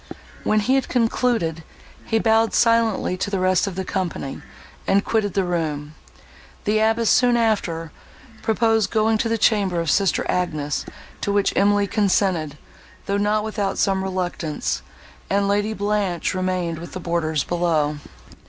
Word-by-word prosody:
When 215 0 +2
he 255 +6 +1
had 270 -1 +1
concluded, 225 -9 0 0.4
he 225 - +1
bowed 225 0 +2
silently 230 -5 +2
to 195 - -2
the 195 -2 -1
rest 185 +1 +2
of 195 - -4
the 190 0 -3
company, 175 -8 -3 0.5
and 200 +1 +3
quitted 215 -3 0
the 195 - +2
room. 155 -4 -2 0.7
The 215 +1 +1
abbess, 225 +1 +2
soon 245 +1 +4
after, 175 -8 0 0.5
proposed 225 -1 +2
going 220 0 +2
to 230 - 0
the 230 - +1
chamber 200 -5 +2
of 165 -1 0
sister 195 -2 +2
Agnes, 155 -5 -1 0.3
to 200 - -1
which 200 -1 +2
Emily 205 0 +3
consented, 185 -7 0 0.5
though 200 0 0
not 210 +1 +1
without 210 -3 -2
some 195 -1 +1
reluctance, 180 - -2 0.5
and 200 0 +1
Lady 205 +2 +1
Blanche 205 -5 -1
remained 185 -3 -2
with 170 - -9
the 185 - -5
boarders 165 -3 -1
below. 160 -4 0
195 Hz, 150 wpm, -22 LUFS, 175-220 Hz, 0.7 s, soon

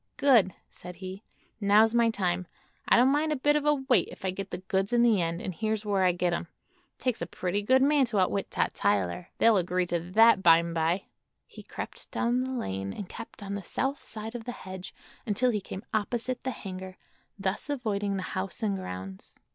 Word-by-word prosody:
"Good!" 230 -10 +4 0.2
said 180 0 -10
he; 190 +2 -8 0.4
"now's 215 +2 +5
my 235 -1 +4
time. 185 -4 -1 0.4
I - - +7
don't 255 +3 +5
mind 305 +2 +1
a - - +2
bit 295 +2 +2
of 300 0 0
a 295 - +5
wait 265 -8 +2
if 195 - -9
I 190 - +1
get 195 +1 -6
the - - -4
goods 190 +3 -1
in 240 0 +5
the 225 -6 +4
end; 170 0 -1
and 185 - -3
here's 220 +2 -2
where 200 -2 +1
I 180 - +5
get 175 0 0
'em. 170 - -3 0.5
It - - -19
takes 250 -3 0
a - - -2
pretty 185 +3 -2
good 260 +5 +4
man 285 -1 +4
to 220 -3 -3
outwit 195 +1 +1
Tot - - 0
Tyler. 100 - 0
They'll 225 -2 +5
agree 180 0 +1
to 175 -1 -1
that, 195 +4 +5
by'm'by." 170 +1 +3 0.4
He - - -12
crept - - -8
down 245 +1 0
the 260 - -4
lane 95 - -3
and 200 - -6
kept 225 0 -10
on 200 0 -5
the 200 - -3
south 270 +8 -2
side 220 +1 -6
of 235 -2 -7
the 245 - -4
hedge 185 -4 -8 0.4
until 235 +4 +2
he 210 -3 -1
came 195 +3 -8
opposite 240 +4 -1
the 260 - -1
hangar, 190 -5 -7 0.4
thus 195 +7 -2
avoiding 205 -7 -1
the 190 - -3
house 190 +4 -4
and 205 -2 +1
grounds. 95 - -7
200 Hz, 210 wpm, -28 LUFS, 185-235 Hz, 0.5 s, I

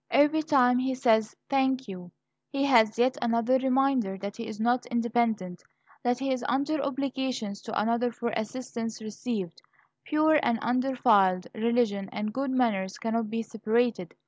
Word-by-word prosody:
Every 295 +2 +4
time 255 -5 +3
he 260 0 -1
says 220 -4 +2
"thank 265 -2 +1
you," 180 -2 -8 0.4
he 275 -1 -1
has 225 -6 +4
yet 255 +4 +2
another 235 +2 +2
reminder 260 -6 +1
that 200 +1 -6
he 230 -1 -6
is 220 -1 -7
not 245 +2 +1
independent, 230 -6 -1 0.4
that 245 0 +1
he 270 +1 -1
is 255 -2 -4
under 285 +3 0
obligations 265 -6 -3
to 220 - -3
another 235 +3 +1
for 235 0 -3
assistance 230 0 -4
received. 215 -4 -5 0.4
Pure 310 0 +3
and 235 - +1
undefiled 235 -7 +2
religion 220 -4 0
and 210 0 -4
good 270 +2 -2
manners 215 -7 0
cannot 225 -1 -2
be 230 +1 -2
separated. 225 -4 -1
235 Hz, 150 wpm, -27 LUFS, 220-260 Hz, 0.4 s, Every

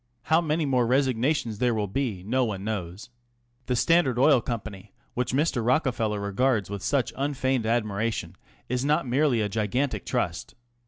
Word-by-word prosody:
How 160 +5 +3
many 155 -1 0
more 125 -4 +2
resignations 130 -2 +1
there 120 -2 +2
will 105 -1 0
be 105 -3 -3
no 130 +6 +1
one 100 -5 -3
knows. 100 0 -5 0.6
The 125 - +1
Standard 140 -2 +3
Oil 135 0 +5
Company, 110 -4 -6 0.2
which 125 0 -1
Mr. 135 -3 +1
Rockefeller 120 -4 +1
regards 100 0 0
with 100 -1 -4
such 130 +3 0
unfeigned 130 -4 -1
admiration, 110 -5 -1 0.3
is 125 +1 -1
not 150 +1 +1
merely 130 -2 +2
a 105 - 0
gigantic 110 +6 -1
trust. 100 -10 -3
120 Hz, 155 wpm, -26 LUFS, 105-135 Hz, 0.6 s, Oil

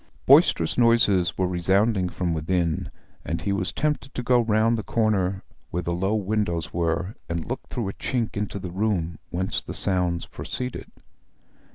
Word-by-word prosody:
Boisterous 80 +8 +5
noises 110 -7 +4
were 95 - +1
resounding 95 +2 +2
from 90 -1 -2
within, 80 0 -1 0.3
and 85 +3 -3
he 100 - 0
was 95 -2 -1
tempted 150 -2 -2
to 125 - -3
go 125 0 +4
round 115 +1 +2
the 110 - -2
corner, 100 -4 0 0.3
where 90 +1 -3
the 85 - -1
low 95 +5 0
windows 100 -5 -1
were, 85 +3 -1 0.2
and 85 -1 -2
look - - -5
through 115 -5 -3
a 100 - -3
chink 120 -4 -2
into 105 -1 -3
the 95 -2 -6
room 90 -5 -1
whence 95 +2 -2
the - - -7
sounds 90 -3 +1
proceeded. 125 -1 -6
95 Hz, 165 wpm, -25 LUFS, 85-110 Hz, 0.3 s, Boisterous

